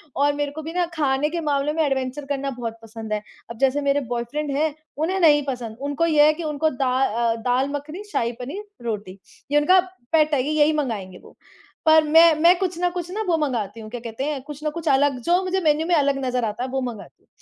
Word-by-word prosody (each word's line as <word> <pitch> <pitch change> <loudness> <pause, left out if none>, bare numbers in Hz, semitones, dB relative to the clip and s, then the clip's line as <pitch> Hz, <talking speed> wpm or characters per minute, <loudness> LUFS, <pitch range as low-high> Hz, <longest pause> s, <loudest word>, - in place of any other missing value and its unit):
और 285 +1 +2
मेरे 290 -1 -2
को 315 +2 -7
भी 325 +2 -7
ना 355 -1 +1
खाने 290 0 +1
के 340 +1 -3
मामले 295 0 0
में 320 0 +1
एडवेंचर 265 +1 -2
करना 275 0 -2
बहुत 230 -2 -5
पसंद 220 -1 -7
है। 210 - -1 0.3
अब 230 - -8
जैसे 275 +2 +2
मेरे 280 0 +1
बॉयफ्रेंड 245 +5 -3
हैं, 310 -1 +1 0.2
उन्हें 365 +5 0
नहीं 295 -4 +5
पसंद, 235 -4 -4
उनको 285 +3 0
यह 300 -2 +5
है 310 - +5
कि 335 +1 -7
उनको 310 +1 0
दा 260 -2 -1
अ, 230 -1 +1
दाल 250 +4 0
मखनी, 300 +7 -6
शाही 235 0 0
पनीर, 295 +12 -6 0.2
रोटी 205 -4 -4 0.3
ये 295 - +4
उनका 365 +5 +5 0.3
पेट 310 -1 +3
है, 265 - +3
ये 300 - -2
यही 300 +1 +5
मँगाएँगे 210 -11 -3
वो। - - -17 0.5
पर 315 0 +6
मैं, 325 +2 +6
मैं 345 +3 +6
कुछ 365 -3 -2
ना 355 - +2
कुछ 350 -1 -5
ना 435 +3 -3
वो 335 -2 +2
मँगाती 235 -7 -2
हूँ 215 - -9
क्या 245 +1 -6
कहते 230 +2 -5
हैं, 290 -2 -2
कुछ 295 +1 -9
न 305 - +1
कुछ 335 +1 -7
अलग 275 -1 +3
जो 355 +2 +3
मुझे 375 +1 0
मेन्यू 310 0 +2
में 355 - +1
अलग 280 -2 +2
नज़र 250 -2 0
आता 220 +3 -3
है, 260 - -3
वो 265 0 -2
मँगाती 240 -4 -7
हूँ, - - -36
285 Hz, 240 wpm, -23 LUFS, 250-315 Hz, 0.5 s, पर